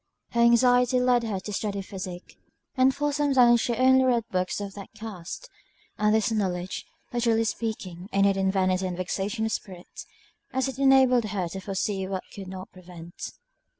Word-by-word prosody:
Her 235 Hz, -, +1 dB
anxiety 245 Hz, +1 st, +5 dB
led 250 Hz, -1 st, +3 dB
her 205 Hz, -4 st, -2 dB
to 210 Hz, -, -6 dB
study 200 Hz, -1 st, -2 dB
physic, 185 Hz, -2 st, -8 dB, 0.4 s
and 260 Hz, 0 st, +5 dB
for 290 Hz, 0 st, -1 dB
some 290 Hz, -1 st, +1 dB
time 240 Hz, -2 st, +7 dB
she 235 Hz, 0 st, -1 dB
only 260 Hz, +2 st, +5 dB
read 245 Hz, -3 st, +2 dB
books 185 Hz, +1 st, -1 dB
of 200 Hz, -1 st, -5 dB
that 200 Hz, -1 st, -9 dB
cast; 215 Hz, -, -7 dB, 0.5 s
and 210 Hz, +1 st, +3 dB
this 220 Hz, +1 st, +1 dB
knowledge, 185 Hz, -4 st, -2 dB, 0.3 s
literally 230 Hz, -2 st, +2 dB
speaking, 205 Hz, -5 st, -4 dB
ended 195 Hz, 0 st, +3 dB
in 190 Hz, 0 st, +1 dB
vanity 185 Hz, -1 st, +1 dB
and 180 Hz, -1 st, -4 dB
vexation 200 Hz, +4 st, -2 dB
of 220 Hz, -, -2 dB
spirit, 185 Hz, -4 st, -7 dB, 0.5 s
as 265 Hz, +1 st, +1 dB
it 265 Hz, -1 st, -6 dB
enabled 265 Hz, -3 st, +5 dB
her 200 Hz, -4 st, -2 dB
to 190 Hz, -, -6 dB
foresee 190 Hz, 0 st, -2 dB
what 190 Hz, -1 st, -3 dB
she 200 Hz, -, -9 dB
could 190 Hz, -, -8 dB
not 190 Hz, +2 st, -8 dB
prevent. 175 Hz, -2 st, -10 dB
210 Hz, 180 wpm, -26 LUFS, 190-240 Hz, 0.5 s, time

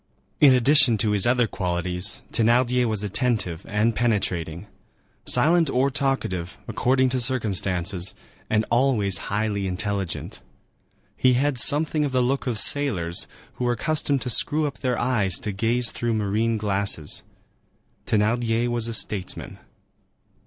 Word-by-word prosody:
In 140 Hz, -3 st, +6 dB
addition 125 Hz, -2 st, +4 dB
to 105 Hz, 0 st, +1 dB
his 105 Hz, +1 st, +3 dB
other 125 Hz, 0 st, +2 dB
qualities, 90 Hz, -1 st, -3 dB
Thénardier 125 Hz, +2 st, +2 dB
was 110 Hz, -3 st, +1 dB
attentive 105 Hz, -5 st, -2 dB
and 105 Hz, +2 st, 0 dB
penetrating, 95 Hz, -7 st, -1 dB, 0.6 s
silent 160 Hz, +5 st, +4 dB
or 135 Hz, +1 st, 0 dB
talkative, 110 Hz, -11 st, -2 dB
according 130 Hz, +1 st, +1 dB
to 130 Hz, 0 st, -2 dB
circumstances, 95 Hz, -7 st, -1 dB, 0.3 s
and 110 Hz, 0 st, +1 dB
always 120 Hz, -6 st, +2 dB
highly 100 Hz, -1 st, -2 dB
intelligent. 95 Hz, 0 st, -4 dB, 0.7 s
He 130 Hz, -1 st, +2 dB
had 135 Hz, +1 st, +1 dB
something 150 Hz, +3 st, +3 dB
of 140 Hz, -3 st, -3 dB
the 130 Hz, -1 st, +2 dB
look 135 Hz, +2 st, -2 dB
of 120 Hz, -3 st, -1 dB
sailors, 100 Hz, -11 st, +3 dB, 0.3 s
who 125 Hz, -, -2 dB
are 120 Hz, -, +1 dB
accustomed 145 Hz, +1 st, -1 dB
to 125 Hz, -, -1 dB
screw 150 Hz, +7 st, +3 dB
up 145 Hz, -, -5 dB
their 125 Hz, -2 st, -2 dB
eyes 110 Hz, -7 st, 0 dB
to 105 Hz, -, -4 dB
gaze 115 Hz, +4 st, 0 dB
through 120 Hz, -1 st, -2 dB
marine 110 Hz, +2 st, -1 dB
glasses. 100 Hz, -7 st, -1 dB, 0.9 s
Thénardier 115 Hz, +2 st, 0 dB
was 120 Hz, -1 st, -1 dB
a 115 Hz, -, -2 dB
statesman. 100 Hz, -4 st, -3 dB
115 Hz, 135 wpm, -23 LUFS, 100-125 Hz, 0.9 s, In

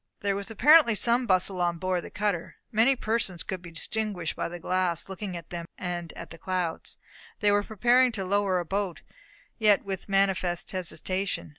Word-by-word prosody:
There 200 Hz, -1 st, +1 dB
was 200 Hz, +2 st, -4 dB
apparently 265 Hz, +2 st, +6 dB
some 235 Hz, +3 st, +3 dB
bustle 185 Hz, -1 st, +1 dB
on 175 Hz, -1 st, +1 dB
board 185 Hz, 0 st, -1 dB
the -, -, -8 dB
cutter. 200 Hz, -5 st, -2 dB, 0.2 s
Many 235 Hz, +4 st, +4 dB
persons 215 Hz, -7 st, -1 dB
could 185 Hz, -2 st, -5 dB
be 175 Hz, -, -10 dB
distinguished 190 Hz, 0 st, -3 dB
by -, -, -2 dB
the 175 Hz, -, -6 dB
glass 180 Hz, -1 st, -1 dB
looking 190 Hz, -1 st, -5 dB
at 170 Hz, -, -11 dB
them 170 Hz, -1 st, -5 dB
and 175 Hz, -2 st, -4 dB
at 170 Hz, -, -9 dB
the 165 Hz, -, -10 dB
clouds. 180 Hz, -3 st, -2 dB, 0.4 s
They 210 Hz, -2 st, +3 dB
were 205 Hz, 0 st, +4 dB
preparing 240 Hz, +5 st, +3 dB
to 195 Hz, -3 st, -3 dB
lower 200 Hz, -1 st, +2 dB
a 175 Hz, -, -2 dB
boat, 195 Hz, -1 st, -2 dB, 0.6 s
yet 210 Hz, -3 st, +4 dB
with 195 Hz, 0 st, -5 dB
manifest 190 Hz, -3 st, +1 dB
hesitation. 185 Hz, 0 st, -3 dB
190 Hz, 180 wpm, -27 LUFS, 175-210 Hz, 0.6 s, apparently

